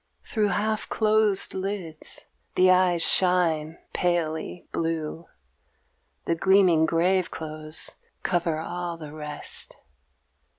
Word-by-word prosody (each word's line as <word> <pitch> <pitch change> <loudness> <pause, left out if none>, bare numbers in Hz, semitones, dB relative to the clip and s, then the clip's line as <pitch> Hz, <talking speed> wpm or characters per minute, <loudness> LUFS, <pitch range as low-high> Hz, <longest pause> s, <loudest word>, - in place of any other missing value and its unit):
Through 215 -2 0
half 215 +3 -1
closed 215 -2 +2
lids 190 -5 -4 0.3
the 185 0 +6
eyes 180 -2 +4
shine 165 -4 +3 0.2
palely 175 -1 -1
blue; 165 0 -3 1.0
The - - +1
gleaming 180 -2 +4
grave 180 +2 +2
clothes 155 0 -5 0.3
cover 170 -3 0
all 175 +1 -4
the 155 -2 -9
rest. 150 -1 -5
175 Hz, 95 wpm, -26 LUFS, 160-190 Hz, 1.0 s, the